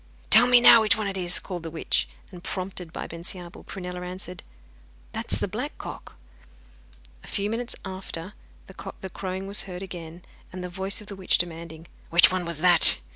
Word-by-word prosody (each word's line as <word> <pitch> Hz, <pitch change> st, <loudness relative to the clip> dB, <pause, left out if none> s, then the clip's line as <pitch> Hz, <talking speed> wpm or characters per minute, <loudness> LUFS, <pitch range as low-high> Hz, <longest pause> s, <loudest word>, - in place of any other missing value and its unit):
'Tell 235 Hz, +3 st, +9 dB
me 245 Hz, -1 st, +7 dB
now 235 Hz, -1 st, +8 dB
which 215 Hz, 0 st, +4 dB
one 215 Hz, -, -2 dB
it 195 Hz, -1 st, -3 dB
is,' 180 Hz, -2 st, +1 dB
called 180 Hz, -3 st, -4 dB
the 165 Hz, -, -6 dB
witch. 160 Hz, -, 0 dB, 0.2 s
And, 175 Hz, -1 st, -12 dB
prompted 185 Hz, -3 st, -5 dB
by -, -, -6 dB
Bensiabel, 175 Hz, +1 st, -8 dB
Prunella 180 Hz, -1 st, -7 dB
answered: 180 Hz, -1 st, -7 dB, 0.7 s
'That -, -, -5 dB
is -, -, +3 dB
the -, -, 0 dB
black -, -, -5 dB
cock.' -, -, -9 dB, 1.1 s
A -, -, -13 dB
few 205 Hz, +1 st, -2 dB
minutes 235 Hz, +1 st, -3 dB
after 185 Hz, -1 st, -6 dB, 0.3 s
the 190 Hz, 0 st, -9 dB
crowing 190 Hz, 0 st, -5 dB
was 200 Hz, +1 st, +3 dB
heard 180 Hz, +1 st, -7 dB
again, 175 Hz, -2 st, -9 dB, 0.3 s
and 185 Hz, 0 st, -7 dB
the 180 Hz, -, -5 dB
voice 190 Hz, +4 st, 0 dB
of 210 Hz, -, -13 dB
the 200 Hz, -, -4 dB
witch 190 Hz, -1 st, +2 dB
demanding 165 Hz, -1 st, -5 dB, 0.2 s
'Which 170 Hz, +2 st, +8 dB
one 185 Hz, -1 st, -2 dB
was 170 Hz, -2 st, -5 dB
that? 175 Hz, -2 st, +7 dB
180 Hz, 185 wpm, -25 LUFS, 175-195 Hz, 1.1 s, Tell